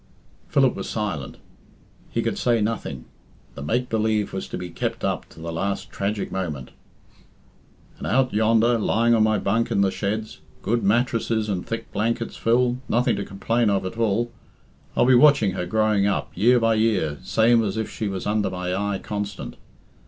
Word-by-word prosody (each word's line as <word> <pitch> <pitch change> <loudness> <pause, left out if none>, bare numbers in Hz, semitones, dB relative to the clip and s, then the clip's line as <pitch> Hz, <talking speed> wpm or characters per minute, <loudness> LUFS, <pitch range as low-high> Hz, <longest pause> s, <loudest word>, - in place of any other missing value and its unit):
Philip 140 -6 +3
was 95 - -5
silent. 100 - -3 0.7
He - - -1
could - - -2
say 120 -2 +2
nothing. 105 - -3 0.5
The - - -9
make 120 - 0
believe 110 -2 0
was 95 - -4
to - - -5
be 90 -1 -6
kept - - -3
up - - -2
to - - -15
the 85 0 -5
last 100 +4 -3
tragic 100 +1 -2
moment. 80 -9 -4 1.3
"And - - -4
out 130 -1 +2
yonder, 115 +2 +3
lying 115 +2 +2
on 115 - +4
my 110 0 +3
hunk 115 +4 0
in 100 - +2
the 95 -1 +3
sheds 110 +5 -3 0.2
good 120 +2 +1
mattresses 115 0 +1
and 95 -3 -3
thick 115 - -5
blankets, 115 +2 -1
Phil, 120 +2 +2
nothing 120 +2 +2
to 100 - -3
complain 115 +4 0
of 95 -2 0
at 95 - -5
all 115 +1 0 0.6
I'll - - +4
be 130 - +5
watching 125 -6 +6
her 90 -1 -3
growing 105 0 +2
up, 100 - -1
year 120 +4 +4
by 115 -1 +3
year, 105 -10 +1
same 115 - +3
as 100 0 -2
if 110 - -1
she 110 - -4
was 95 -2 -4
under 105 -1 +1
my 90 0 -3
eye 100 0 -1
constant. 105 0 -5
110 Hz, 180 wpm, -24 LUFS, 95-115 Hz, 1.3 s, watching